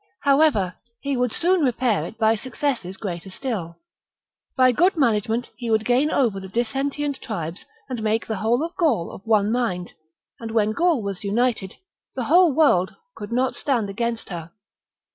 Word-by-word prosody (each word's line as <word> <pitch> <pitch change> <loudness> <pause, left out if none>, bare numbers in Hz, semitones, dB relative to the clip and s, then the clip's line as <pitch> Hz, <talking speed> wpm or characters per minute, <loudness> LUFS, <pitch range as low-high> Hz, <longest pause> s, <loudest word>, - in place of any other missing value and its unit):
However, 275 - +3 0.3
he 280 -1 -1
would 250 -2 0
soon 355 +5 +2
repair 245 -5 +1
it 225 - -11
by 220 0 +3
successes 240 -5 -3
greater 180 -3 -5
still. 190 -7 -4 0.8
By 255 -1 +6
good 355 - +3
management 230 -2 +1
he 240 -2 -4
would 220 -1 +2
gain 255 +5 +3
over 235 -10 +1
the 190 - -8
dissentient 270 +6 -2
tribes 175 -6 -5 0.2
and 250 -4 -4
make 220 +1 0
the 220 - -3
whole 235 +9 +1
of 340 +2 -8
Gaul 270 - +1
of - - -10
one 215 -1 +3
mind; 190 -8 -1 0.5
and 230 - -6
when 220 -1 +2
Gaul 325 0 +2
was 200 -1 -4
united, 215 -1 0 0.4
the 255 - -2
whole 345 +6 +5
world 260 - +3 0.2
could 205 +1 -8
not 255 +2 +1
stand 235 -8 -1
against 235 +2 -3
her. 170 -3 -6
235 Hz, 165 wpm, -23 LUFS, 205-270 Hz, 0.8 s, By